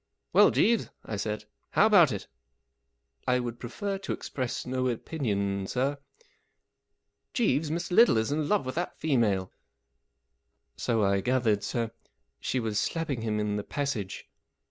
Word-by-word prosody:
" - - -47
Well, - - +7
Jeeves," 230 0 +2 0.2
I 110 - -4
said, 105 +1 -2
44 105 - -24 0.2
how 210 - +4
about 190 -10 +6
it? 100 - -5 0.3
" 70 0 -51
" - - -41
I 125 0 +3
would 120 -1 -4
prefer 195 - -4
to - - -3
express 130 -3 -4
no 130 0 -1
opinion, 100 -7 -1
sir." 130 +5 +1
44 140 -1 -8 1.3
Jeeves, 160 - +2
Mr. 170 +3 -3
Little 225 - +6
is 110 +4 0
in 150 0 0
love 210 -9 +2
with 130 - -3
that 175 +2 -3
female." 110 -11 +1 0.6
" 70 +3 -50
So 115 -2 +2
I 100 0 +2
gathered, 115 -4 +1
sir. 115 -2 -2 0.5
She 130 - -1
was 110 -3 -1
slapping 150 -5 -1
him 110 -1 -1
in 105 0 0
the 105 - -3
passage." 115 -10 -3
120 Hz, 165 wpm, -28 LUFS, 105-145 Hz, 1.3 s, Well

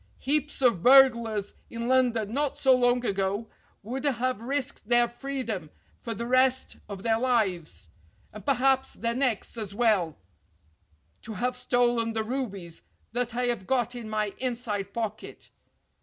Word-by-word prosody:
Heaps 295 0 -1
of 230 -9 +4
burglars 235 -5 +5 0.2
in 235 0 -4
London 240 -4 +2
not 285 +1 0
so 265 -1 +5
long 245 0 +2
ago 200 +2 -1 0.4
would 255 +6 -5
have 255 -4 0
risked 255 -3 -3
their 240 0 +5
freedom 240 - -5 0.3
for 230 -1 -5
the 235 +3 -4
rest 255 +1 +3
of 200 -1 -7
their 225 -1 +2
lives, 185 - -1 0.4
and 215 - -9
perhaps 265 -1 +2
their 230 0 -1
necks 240 -3 -1
as 200 -2 -5
well, 205 -9 +2 1.0
to 220 - -7
have 250 +6 -1
stolen 240 -2 +1
the 220 0 -1
rubies 200 -9 -4 0.3
that 240 0 -2
I 250 +1 0
have 235 -6 -2
got 245 -2 +1
in 235 -3 -7
my 215 -1 -1
inside 230 -6 -3
pocket. 220 -1 -5
235 Hz, 145 wpm, -27 LUFS, 215-255 Hz, 1.0 s, burglars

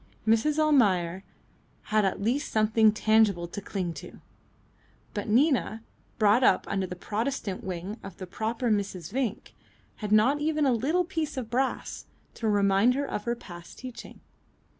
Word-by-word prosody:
Mrs. 230 +8 +3
Almayer 195 - +2 0.7
had 215 -1 +4
at 190 - -1
least 240 +8 -1
something 215 0 +4
tangible 215 -5 +2
to 205 - -7
cling 185 -4 -3
to, - - -12 0.9
but 205 -2 -4
Nina, 240 -2 +2 0.3
brought 215 +3 +4
up 190 - +4
under 195 -1 -1
the 180 - -6
Protestant 210 +1 -3
wing 185 +4 -5
of 190 - -10
the 185 - -6
proper 225 +5 -2
Mrs. 195 -5 -2
Vinck, 255 -5 -3 0.4
had 210 -2 -5
not 245 +8 +4
even 305 -1 +1
a 260 - +3
little 295 +10 +1
piece 325 -5 -3
of 240 -3 -5
brass 260 +2 -2 0.3
to 225 - -2
remind 200 +3 +3
her 285 +1 -1
of 210 - -4 0.2
past 175 -2 -11
teaching. 255 -2 -10
220 Hz, 150 wpm, -27 LUFS, 195-255 Hz, 0.9 s, had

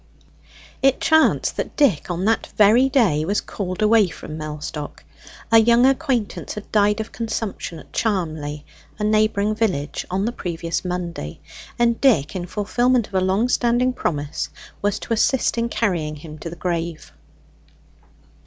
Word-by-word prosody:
It 270 -1 +3
chanced 315 0 +3
that - - -4
Dick 225 - +2
on 175 +2 -2
that 225 +1 +1
very 225 +6 +5
day 215 - +3
was 200 +6 0
called 185 0 -4
away 215 -2 +5
from 160 -2 -8
Mellstock. 150 -1 -6 0.5
A 225 - +8
young 235 +2 +5
acquaintance 265 -5 0
had 210 - -9
died 210 0 +3
of 220 - -5
consumption 220 -6 -4
at - - -15
Charmley, 155 -8 -2 0.3
a - - -4
neighbouring 215 -1 +2
village, 190 -10 -2
on 190 +2 -1
the 235 - 0
previous 170 -6 -4
Monday, 175 - -4 0.4
and 235 -1 +2
Dick, 195 - +3
in 180 -1 -4
fulfilment 240 +4 +1
of - - -25
a 190 - +2
long 190 +6 +2
standing 245 +1 +2
promise, 145 -10 -3 0.3
was 205 0 0
to - - -3
assist 250 +3 +2
in 235 0 0
carrying 170 -10 -1
him 150 +1 -10
to 165 - -6
the 170 - -8
grave. 170 -2 -4
205 Hz, 155 wpm, -22 LUFS, 170-230 Hz, 0.5 s, A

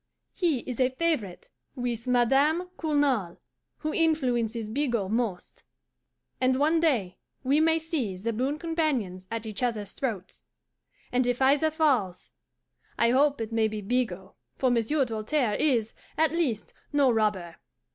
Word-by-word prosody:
He 320 -9 +1
is 250 0 -6
a 255 -1 +4
favourite 260 - -2 0.3
with 245 -2 -3
Madame 275 +8 +2
Cournal, 285 - 0 0.4
who 310 0 -3
influences 245 -9 0
Bigot 235 -7 -1
most, 225 -6 -3 0.8
and 255 0 +3
one 310 +4 +3
day 240 - 0 0.2
we 275 +3 +3
may 320 +1 +4
see 310 - -2
the 230 +5 -3
boon 265 +6 -1
companions 295 - -2
at 230 -1 -4
each 215 +1 -5
other's 215 -5 -2
throats; 215 -8 -5 0.6
and 250 0 +1
if 245 0 0
either 280 +4 +4
falls, 265 - 0 0.7
I 235 0 +3
hope 280 +2 +3
it 225 0 -4
maybe 220 -1 0
Bigot, 195 -4 -2 0.2
for 260 -2 +1
Monsieur 245 +5 +1
Doltaire 225 +1 -1
is, 235 -7 +1 0.2
at 315 -1 +3
least, 285 -11 -1 0.2
no 280 -3 +4
robber. 210 -7 0
250 Hz, 135 wpm, -27 LUFS, 220-295 Hz, 0.8 s, a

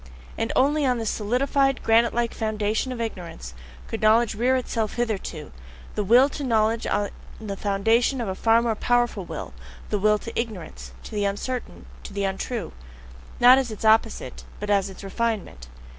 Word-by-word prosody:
And 225 - -2
only 290 +3 +3
on 250 -2 +2
this 225 -2 -1
solidified, 270 +5 +1
granite 230 +1 +4
like 235 -1 0
foundation 215 +3 -1
of 250 - -5
ignorance 175 - -6 0.3
could 225 - -5
knowledge 220 +1 +4
rear 245 +5 +2
itself 230 -4 -2
hitherto, 205 -10 -3 0.4
the 210 - -1
will 240 +7 +6
to 290 - -6
knowledge 225 -2 +1
on 205 0 0 0.3
the 210 -3 -5
foundation 225 +7 +1
of 235 - -2
a 190 - -1
far 225 +4 +3
more 235 -2 +1
powerful 240 -3 0
will, - - -7 0.4
the 210 - +1
will 210 +1 +4
to 230 +2 -8
ignorance, 215 -9 -5
to - - -10
the 205 -2 -1
uncertain, 235 +5 -4 0.2
to - - -10
the 200 0 -2
untrue! 195 +1 -3 0.7
Not 250 +2 +8
as 260 -3 -2
its 215 0 -6
opposite, 220 +1 +2 0.2
but 210 0 -3
as 200 -1 +2
its 190 - -11
refinement! 195 - -3
225 Hz, 175 wpm, -24 LUFS, 205-240 Hz, 0.7 s, Not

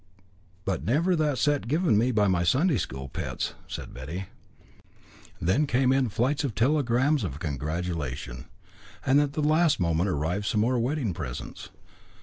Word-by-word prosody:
"But 95 -5 -1
never 160 - +2
that 150 -4 +1
set 145 -4 +1
given 155 - +2
me 120 +5 +3
by 105 -3 +3
my 90 -2 +2
Sunday 135 - +3
school 65 -4 -5
pets," - - -4
said - - -7
Betty. 80 +10 -6 1.1
Then 130 - +2
came 130 0 +2
in 135 -3 +2
flights 130 +8 0
of 130 -7 -2
telegrams 135 +1 +2
of 70 -7 -4
congratulation. 75 -4 -4 0.6
And 135 +2 +5
at 145 -1 -1
the 155 - -1
last 155 0 +3
moment 85 +2 +1
arrived 90 +6 -1
some 105 - +1
more 125 +2 +2
wedding 125 - -1
presents. 60 -6 -6
115 Hz, 150 wpm, -27 LUFS, 85-145 Hz, 1.1 s, And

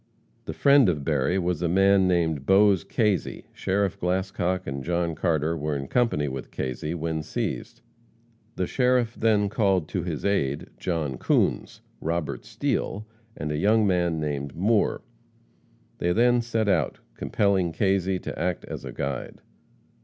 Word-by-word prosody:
The - - -4
friend 140 -6 +5
of 75 -5 -1
Berry 75 +4 +1
was 90 -2 -1
a 85 - +1
man 95 +1 +4
named 80 -6 0
Bose 100 -1 +5
Kazy. 105 -5 -1
Sheriff 95 0 -1
Glascock 95 0 -1
and 70 -1 -4
John 85 0 -1
Carter 80 -1 0
were 75 -1 -2
in 70 -1 -4
company 115 - +1
when 65 -1 -5
Kazy 65 +5 -4
was 80 -1 -3
seized. - - -4 0.7
The 90 - -1
sheriff 125 +1 +1
then 105 -2 +2
called 95 -6 +1
to 95 - -2
his 85 -1 -4
aid 70 -9 0
John 75 -8 -2
Coons, - - 0 0.2
Robert 85 -1 -3
Steele, 105 +2 -2 0.3
and 75 0 -3
a 75 - -1
young 105 +5 +3
man 85 -4 +1
named 70 -2 -3
Moore. 105 +5 +1 1.0
They 85 - +1
then 120 +2 +4
set 115 -2 -1
out, 80 -9 +1 0.2
compelling 95 +5 +1
Kazy 95 +1 +1
to - - -5
act 90 -1 -2
as - - -7
a - - -6
guide. 70 -2 -4
90 Hz, 150 wpm, -25 LUFS, 75-100 Hz, 1.0 s, friend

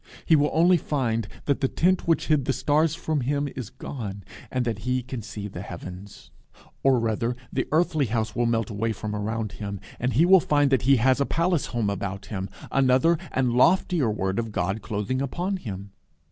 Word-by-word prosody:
He 160 - +5
will 150 0 +3
only 175 +3 +5
find 115 -9 -1 0.2
that 140 - 0
the 135 - +3
tent 180 +6 +1
which 165 - +2
hid 150 -4 +2
the 135 - +1
stars 155 +3 +2
from 155 -3 -1
him 145 +3 0
is 125 -6 -5
gone, 100 -7 -7 0.3
and 125 -1 -1
that 115 -3 -2
he 125 +3 -1
can 125 -1 -6
see 105 -1 -6
the 90 -3 -7
heavens; 90 +1 -9 0.5
or 135 -2 +4
rather, 115 +1 -1 0.2
the 130 - -1
earthly 155 -3 +2
house 110 -1 -2
will 120 0 +1
melt 115 -2 0
away 110 +2 -1
from 105 0 -5
around 110 +1 -2
him, 100 0 -6 0.2
and 125 +1 0
he 150 +9 +5
will 190 +1 +7
find 145 -3 +2
that 130 -4 +3
he 140 - +8
has 130 +3 +3
a - - +3
palace 170 -1 +1
home 115 -4 -1
about 100 0 -4
him, 95 -1 -3 0.2
another 135 +5 +4 0.2
and 130 -2 +1
loftier 165 0 +3
word 95 -1 -1
of 115 -2 -3
God 95 +2 -1
clothing 110 +4 -2
upon 175 +8 -2
him. 100 - -7
125 Hz, 200 wpm, -25 LUFS, 105-145 Hz, 0.5 s, he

